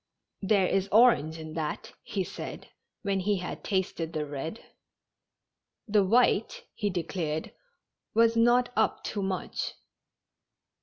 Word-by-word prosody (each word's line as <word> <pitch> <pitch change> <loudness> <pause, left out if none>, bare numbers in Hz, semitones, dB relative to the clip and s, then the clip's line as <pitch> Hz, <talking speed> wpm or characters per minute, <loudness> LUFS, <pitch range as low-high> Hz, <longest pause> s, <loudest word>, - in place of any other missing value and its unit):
"There 195 -1 +3
is 195 +1 0
orange 210 -9 +5
in 155 -1 -8
that," 155 -2 -4
he 195 - -2
said, - - -8 0.3
when 200 -1 0
he 200 +2 +1
had 180 -1 -6
tasted 180 -4 -1
the 155 -2 -1
red. 150 +8 -5 1.3
The 205 -1 +4
white, 245 - +2
he 205 -2 -1
declared, 165 -3 -3 0.6
was 230 0 +5
not 245 +2 +4
up 220 - +1
to 205 - -2
much. 190 -1 -3
195 Hz, 120 wpm, -28 LUFS, 165-220 Hz, 1.3 s, orange